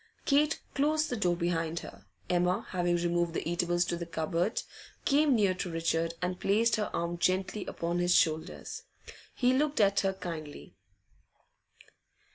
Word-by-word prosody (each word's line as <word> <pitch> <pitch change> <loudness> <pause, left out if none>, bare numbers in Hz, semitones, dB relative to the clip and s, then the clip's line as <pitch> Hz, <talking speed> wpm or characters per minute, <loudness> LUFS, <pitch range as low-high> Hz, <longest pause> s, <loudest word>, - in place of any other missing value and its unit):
Kate 300 +2 +3
closed 305 +2 +1
the - - 0
door 180 -6 +1
behind 170 -1 -1
her. - - -12 0.2
Emma, 180 +1 +1
having 175 -2 +1
removed 175 -1 0
the - - -2
eatables 175 0 +1
to 175 - -2
the 170 0 -5
cupboard, 165 +5 -1 0.4
came 285 -1 +4
near 200 -4 +3
to 185 0 -4
Richard 165 0 -1
and 180 0 -2
placed 225 +4 +3
her 210 - -1
arm 170 0 -2
gently 190 +3 0
upon 170 +1 -2
his 175 0 +3
shoulders. 160 -1 0 0.5
He 250 0 +3
looked 290 0 +1
at 200 -1 +4
her 195 -1 +1
kindly. 165 -5 -7
175 Hz, 150 wpm, -30 LUFS, 170-210 Hz, 0.5 s, came